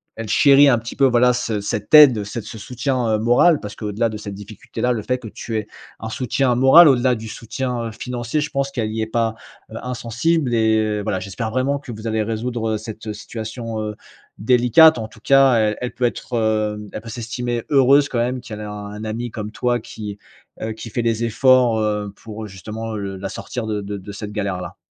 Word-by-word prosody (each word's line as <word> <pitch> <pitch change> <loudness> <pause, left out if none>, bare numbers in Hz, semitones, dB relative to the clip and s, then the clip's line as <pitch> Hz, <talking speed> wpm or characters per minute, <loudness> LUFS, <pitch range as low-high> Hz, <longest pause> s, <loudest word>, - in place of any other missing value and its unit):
elle 115 -1 -6
chérit 140 +4 +6
un 120 - +4
petit 115 +1 -7
peu, 140 - +4
voilà, 125 0 +4
ce 115 -4 -2
cette 100 +1 -4
aide, 130 -9 +8
cet 105 +3 -6
ce 110 - -9
soutien, 125 -1 -1
heu, - - +1
moral 120 +9 +4
parce 105 -1 -8
qu'au 105 -1 -5
delà 115 +3 0
de 110 - -6
cette 100 -2 -7
difficulté-là, 105 +4 -4
le 115 -3 -1
fait 125 +4 -1
que 125 -3 -10
tu 110 +1 -5
aies 105 - -4 0.3
un 110 - -5
soutien 125 +2 0
moral, 135 +7 +8
au-delà 125 -2 +3
du 110 0 -8
soutien, 120 +1 -4
heu, - - -6
financier, 120 +4 -3
je 150 0 -3
pense 140 0 -1
qu'elle 115 -5 -3
y 110 - -2
est 110 - -2
pas, 115 0 0 0.4
heu, 110 - -7
insensible 125 +4 -1
et 110 -2 +2
voilà, 100 -3 -2
j'espère 100 +4 -4
vraiment 130 +4 0
que 140 -3 -9
vous 110 0 -9
allez 110 -1 0
résoudre, 115 +1 -2
heu, - - -1
cette 110 0 -7
situation, 110 +1 -6
heu, 105 -1 -4 0.4
délicate. 125 +6 +5
En 110 - -4
tout 115 -2 -18
cas, 135 -2 +5
elle 110 -2 +1
elle 125 - -3
peut 125 - 0
être, 120 +1 -3
hem, 105 -1 -1
elle - - -5
peut 115 - -10
s'estimer 120 +1 -4
heureuse 140 +1 +5
quand 120 - -1
même 125 +2 -1
qu'elle 110 -3 -8
ait - - -6
un 105 0 -7
ami 115 +2 -4
comme 105 -1 -5
toi, 120 +2 -1
qui, 105 -2 -8 0.4
heu, 110 0 -3
qui 115 +1 -9
fait 120 - -1
les 115 0 0
efforts, 125 0 +4
heu, 105 -2 -1
pour, 110 0 -8
justement, 110 +3 -6
heu, 100 -2 -4
la 95 +1 -5
sortir 125 -2 -5
de 105 -1 -2
de 100 0 -5
de 100 +2 -9
cette 105 +1 -7
galère-là. 100 -3 -4
115 Hz, 220 wpm, -20 LUFS, 105-125 Hz, 0.4 s, aide